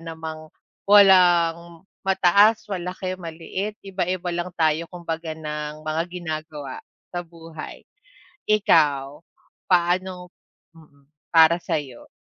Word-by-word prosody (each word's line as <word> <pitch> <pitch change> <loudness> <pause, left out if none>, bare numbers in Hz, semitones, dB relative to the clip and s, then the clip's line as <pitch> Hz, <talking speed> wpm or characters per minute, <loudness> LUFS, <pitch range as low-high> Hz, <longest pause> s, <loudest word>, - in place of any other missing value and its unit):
namang 160 -1 -8 0.4
walang 175 -4 +5 0.2
mataas, 195 +3 +4
malaki, 185 0 -4
maliit, 175 +5 -5
iba-iba 185 -2 -2
lang 175 +1 -3
tayo 160 0 +1
kumbaga 165 -2 -5
ng 150 -1 -6
mga 155 +1 -1
ginagawa 155 -5 -6 0.3
sa 175 - -2
buhay. 165 -2 -10 0.7
Ikaw 150 -9 +2 0.5
paano 180 0 +1 0.4
mm, 150 -4 -21 0.2
para 165 +1 +5
sayo? 145 -8 -5
170 Hz, 95 wpm, -23 LUFS, 155-180 Hz, 0.7 s, walang